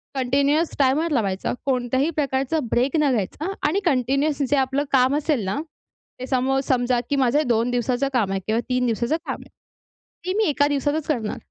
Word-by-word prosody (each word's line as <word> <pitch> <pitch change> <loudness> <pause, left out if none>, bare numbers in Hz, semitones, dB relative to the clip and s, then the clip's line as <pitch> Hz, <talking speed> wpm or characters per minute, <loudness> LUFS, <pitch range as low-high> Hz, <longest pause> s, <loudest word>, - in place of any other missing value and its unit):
Continuous 280 +5 +1
timer 290 +5 +2
लावायचा, 200 -8 -1
कोणत्याही 260 +3 +1
प्रकारचा 280 0 -1
ब्रेक 255 +5 +1
न 295 -2 +3
घ्यायचा 255 - -2 0.2
आणि 370 +7 +1
कंटिन्युअस 275 +1 +1
जे 290 - +3
आपलं 270 +2 +1
काम 260 +1 +4
असेल 295 -7 0
ना, 190 - -1 0.6
ते 255 - -4
सम 260 0 0
हाऊ 270 0 +2
समजा 245 -1 +1
की 285 - +1
माझं 275 +3 +2
2 235 0 +2
दिवसाचं 245 +2 0
काम 210 -6 +1
आहे 195 - -1
किंवा 220 +2 +1
3 250 0 +1
दिवसाचं 235 +6 0
काम - - -2
आहे. - - -19 0.8
ती 370 - -1
मी 440 - +3
1 285 0 +2
दिवसातच 290 +2 -1
करणार 235 -8 -2
265 Hz, 185 wpm, -23 LUFS, 245-290 Hz, 0.8 s, काम